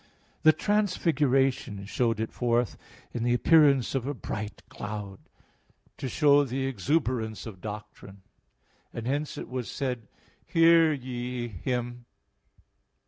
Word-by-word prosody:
The 155 Hz, -, +7 dB
Transfiguration 135 Hz, -, +1 dB
showed 115 Hz, +1 st, 0 dB
it 110 Hz, -, -2 dB
forth 120 Hz, -1 st, +1 dB, 0.4 s
in 120 Hz, -, -3 dB
the 120 Hz, 0 st, +2 dB
appearance 140 Hz, -3 st, +4 dB
of 135 Hz, -1 st, -1 dB
a 145 Hz, -, -2 dB
bright 105 Hz, -3 st, -6 dB
cloud, 105 Hz, -2 st, -6 dB, 0.8 s
to 130 Hz, -, -3 dB
show 145 Hz, +1 st, +5 dB
the 135 Hz, 0 st, -2 dB
exuberance 125 Hz, -, -1 dB
of 100 Hz, -5 st, -9 dB
doctrine; 105 Hz, -2 st, -9 dB, 0.7 s
and 115 Hz, -, -6 dB
hence 145 Hz, +4 st, -2 dB
it -, -, -6 dB
was 125 Hz, -2 st, -4 dB
said, 125 Hz, -6 st, -3 dB, 0.4 s
"Hear 165 Hz, -1 st, +5 dB
ye 125 Hz, -3 st, -4 dB
Him" 120 Hz, +5 st, -2 dB
(Matt. 120 Hz, -, -22 dB
125 Hz, 125 wpm, -28 LUFS, 110-140 Hz, 0.8 s, The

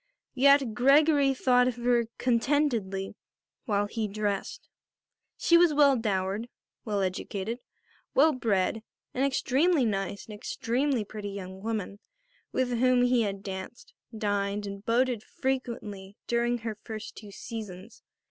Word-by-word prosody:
Yet 275 Hz, -2 st, +4 dB
Gregory 275 Hz, +3 st, +4 dB
thought 250 Hz, -1 st, +3 dB
of 250 Hz, -, -1 dB
her 240 Hz, -, -9 dB
very 240 Hz, -1 st, +3 dB
contentedly 235 Hz, -6 st, 0 dB, 0.5 s
while 205 Hz, -4 st, +1 dB
he 215 Hz, +1 st, -3 dB
dressed. 205 Hz, -1 st, -3 dB, 0.7 s
She 340 Hz, 0 st, +5 dB
was 340 Hz, -4 st, +4 dB
well 285 Hz, -2 st, +6 dB
dowered, 205 Hz, 0 st, -1 dB, 0.3 s
well 205 Hz, -3 st, -1 dB
educated, 195 Hz, +4 st, -3 dB, 0.6 s
well 305 Hz, +3 st, +5 dB
bred; 220 Hz, -4 st, 0 dB, 0.3 s
an 260 Hz, -, 0 dB
extremely 275 Hz, +3 st, +2 dB
nice 195 Hz, -2 st, -2 dB
and 215 Hz, -, -10 dB
extremely 240 Hz, +3 st, -1 dB
pretty 205 Hz, 0 st, -6 dB
young 190 Hz, -1 st, -7 dB
woman 210 Hz, -2 st, -3 dB, 0.5 s
with 250 Hz, -2 st, 0 dB
whom 255 Hz, 0 st, +4 dB
he 245 Hz, -1 st, +3 dB
had 200 Hz, -2 st, -2 dB
danced, 190 Hz, +3 st, -7 dB, 0.2 s
dined 205 Hz, -1 st, -1 dB
and 200 Hz, 0 st, -7 dB
boated 240 Hz, 0 st, +1 dB
frequently 220 Hz, -7 st, -4 dB
during 240 Hz, 0 st, +1 dB
her 225 Hz, -2 st, -6 dB
first 220 Hz, -1 st, -7 dB
two 210 Hz, -, -10 dB
seasons. 210 Hz, -1 st, -8 dB
225 Hz, 130 wpm, -28 LUFS, 200-255 Hz, 0.7 s, well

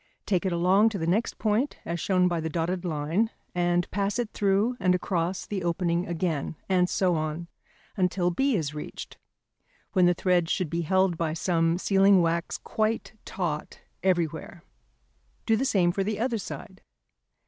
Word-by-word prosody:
Take 190 Hz, -2 st, +1 dB
it -, -, 0 dB
along 185 Hz, +5 st, +4 dB
to 215 Hz, -, -4 dB
the 165 Hz, -, -2 dB
next 195 Hz, +8 st, 0 dB
point, 220 Hz, +6 st, 0 dB
as 170 Hz, 0 st, -3 dB
shown 185 Hz, +1 st, +2 dB
by 175 Hz, -2 st, 0 dB
the 160 Hz, 0 st, -3 dB
dotted 175 Hz, +3 st, -2 dB
line, 165 Hz, +6 st, 0 dB, 0.2 s
and 175 Hz, 0 st, +1 dB
pass 200 Hz, +2 st, -1 dB
it 240 Hz, -3 st, -2 dB
through 205 Hz, +4 st, +1 dB
and 180 Hz, -1 st, +3 dB
across 180 Hz, 0 st, -2 dB
the 195 Hz, -3 st, -4 dB
opening 170 Hz, 0 st, 0 dB
again, 165 Hz, -3 st, -2 dB
and 180 Hz, -2 st, +2 dB
so 185 Hz, -2 st, +2 dB
on, 155 Hz, +1 st, -3 dB, 0.5 s
until 180 Hz, -2 st, +1 dB
B 270 Hz, +8 st, +1 dB
is 150 Hz, -6 st, -2 dB
reached, 150 Hz, -, -8 dB, 0.7 s
when 185 Hz, -3 st, +5 dB
the 175 Hz, -, +3 dB
thread 175 Hz, -2 st, +1 dB
should 180 Hz, -5 st, -1 dB
be 170 Hz, 0 st, 0 dB
held 185 Hz, 0 st, +1 dB
by 160 Hz, -2 st, -1 dB
some 165 Hz, -1 st, +1 dB
sealing 195 Hz, 0 st, +4 dB
wax 170 Hz, 0 st, 0 dB
quite 220 Hz, 0 st, -2 dB
taut 160 Hz, -5 st, -4 dB, 0.2 s
everywhere. 170 Hz, -2 st, -1 dB, 0.8 s
Do 225 Hz, -, +3 dB
the 250 Hz, +5 st, 0 dB
same 180 Hz, -8 st, +3 dB
for 195 Hz, +2 st, -1 dB
the 210 Hz, +1 st, -2 dB
other 235 Hz, -1 st, 0 dB
side. 190 Hz, -1 st, -8 dB
180 Hz, 170 wpm, -27 LUFS, 170-195 Hz, 0.8 s, when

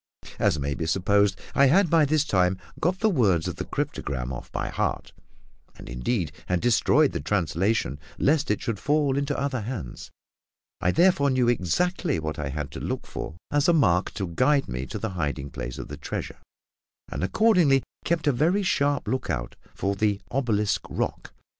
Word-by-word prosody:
As -, -, +2 dB
may 70 Hz, 0 st, -2 dB
be 80 Hz, +2 st, -3 dB
supposed, 100 Hz, +3 st, +2 dB
I 140 Hz, -, +5 dB
had 180 Hz, +7 st, +4 dB
by 160 Hz, -1 st, +4 dB
this 150 Hz, 0 st, +2 dB
time 95 Hz, -5 st, +2 dB, 0.2 s
got 180 Hz, +5 st, 0 dB
the 220 Hz, -, +4 dB
words 100 Hz, -, +2 dB
of -, -, -4 dB
the -, -, -4 dB
cryptogram 65 Hz, -2 st, -3 dB
off 65 Hz, -, -8 dB
by -, -, -3 dB
heart -, -, -2 dB, 0.6 s
and, -, -, -11 dB
indeed, 80 Hz, -, -2 dB, 0.2 s
had 90 Hz, -1 st, +1 dB
destroyed 115 Hz, 0 st, +3 dB
the -, -, -3 dB
translation, 85 Hz, -, 0 dB, 0.2 s
lest 150 Hz, +1 st, +2 dB
it 105 Hz, -, 0 dB
should 115 Hz, -5 st, -2 dB
fall 145 Hz, -2 st, +1 dB
into 140 Hz, 0 st, -1 dB
other 135 Hz, -4 st, -1 dB
hands 105 Hz, -, -6 dB, 0.7 s
I 90 Hz, -, +2 dB
therefore 160 Hz, -, +4 dB
knew 130 Hz, -2 st, +2 dB
exactly 145 Hz, -, +1 dB
what 80 Hz, 0 st, -4 dB
I 75 Hz, -2 st, -2 dB
had 75 Hz, +1 st, -4 dB
to -, -, -7 dB
look -, -, -3 dB
for 80 Hz, -, -6 dB, 0.2 s
as 145 Hz, 0 st, +2 dB
a 175 Hz, -, +5 dB
mark 95 Hz, -, +3 dB
to 100 Hz, -, -2 dB
guide 135 Hz, -, +2 dB
me 65 Hz, +2 st, -4 dB
to 110 Hz, -, -5 dB
the 110 Hz, +2 st, -3 dB
hiding 70 Hz, -6 st, -3 dB
place 65 Hz, -1 st, -6 dB
of -, -, -6 dB
the -, -, -7 dB
treasure, -, -, -5 dB, 0.7 s
and -, -, -3 dB
accordingly 165 Hz, -, +4 dB, 0.2 s
kept 170 Hz, -1 st, 0 dB
a 145 Hz, -, +4 dB
very 170 Hz, +10 st, +2 dB
sharp 145 Hz, -6 st, +1 dB
lookout 75 Hz, -, -2 dB, 0.2 s
for 100 Hz, +1 st, -1 dB
"the 105 Hz, 0 st, +1 dB
obelisk 105 Hz, -6 st, +1 dB
rock." -, -, -3 dB
110 Hz, 180 wpm, -26 LUFS, -, 0.7 s, I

